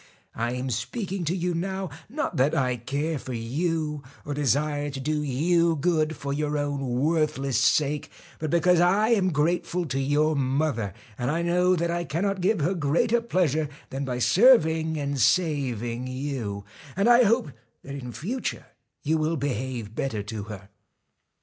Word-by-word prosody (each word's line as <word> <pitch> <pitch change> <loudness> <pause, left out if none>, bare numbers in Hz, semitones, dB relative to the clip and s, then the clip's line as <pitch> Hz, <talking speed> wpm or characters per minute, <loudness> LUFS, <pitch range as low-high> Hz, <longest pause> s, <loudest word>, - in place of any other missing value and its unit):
I 120 +2 -2
am 125 +1 -3
speaking 180 - -3
to 170 +4 0
you 180 -1 -1
now, 190 0 -3 0.2
not 295 +6 -3
that 135 +3 +3
I 125 -2 +1
care 140 +6 -2
for 130 - -6
you 150 +5 -2 0.2
or 145 - -3
desire 145 +1 0
to 135 -1 -6
do 150 +3 -1
you 165 +5 +2
good 160 0 +1
for 140 0 -4
your 150 +1 -1
own 140 -4 -1
worthless 150 -4 +1
sake, 150 -1 +2 0.3
but 155 - -2
because 170 +2 +4
I 195 +5 +4
am 195 -6 +3
grateful 170 +3 0
to 135 -3 -2
your 150 +3 +2
mother, 135 -7 0 0.2
and 125 0 -1
I 165 +3 0
know 180 +1 +3
that 170 0 0
I 175 0 -1
cannot 185 +6 -1
give 195 -1 +2
her 170 +7 +1
greater 180 +9 +1
pleasure 160 - +1 0.2
than 135 +1 -3
by 125 -2 -2
serving 160 - +4
and 140 -1 -2
saving 125 - +1
you, 130 -7 -4 0.3
and 195 +4 +2
I 240 +1 +7
hope 230 - +2 0.3
that 140 - -8
in 125 -3 -6
future 230 - -4 0.4
you 160 +2 +1
will 160 +2 0
behave 125 -5 -3
better 110 -4 -2
to 105 0 -5
her. 100 -2 -9
150 Hz, 165 wpm, -26 LUFS, 130-175 Hz, 0.4 s, I